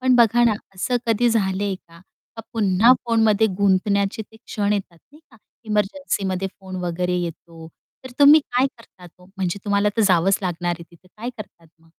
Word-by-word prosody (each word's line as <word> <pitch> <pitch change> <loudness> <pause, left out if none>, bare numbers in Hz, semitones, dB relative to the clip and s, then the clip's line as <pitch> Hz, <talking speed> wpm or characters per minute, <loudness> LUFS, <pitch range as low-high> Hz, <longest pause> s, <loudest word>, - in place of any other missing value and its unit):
पण 255 0 +3
बघा 240 0 +4
ना 230 - +4 0.2
असं 245 +7 -1
कधी 230 +2 +2
झालंय 200 -3 0
का? 170 -2 -17 0.5
पुन्हा 215 +2 +4
फोनमध्ये 220 -2 +3
गुंतण्याचे 200 +1 +1
ते 220 +1 -19
क्षण 210 -2 -2
येतात 185 -4 -4
नाही 305 - -17
का, 225 - -19 0.3
एमर्जन्सीमध्ये 200 -3 -1
फोन 190 -1 -8
वगैरे 180 +1 -1
येतो, 165 -1 -8 0.4
तर 260 - -8
तुम्ही 290 +2 +8
काय 255 0 0
करतात 185 -6 -16
हो? 180 - -18
म्हणजे 190 +1 -2
तुम्हाला 205 0 +2
तर 225 - +3
जावंच 185 +1 +3
लागणार 175 -1 -2
आहे 170 - -11
तिथे 175 +2 -21
काय 235 +3 -5
करतात 170 -5 -11
मग? 165 - -26
200 Hz, 170 wpm, -21 LUFS, 180-225 Hz, 0.5 s, तुम्ही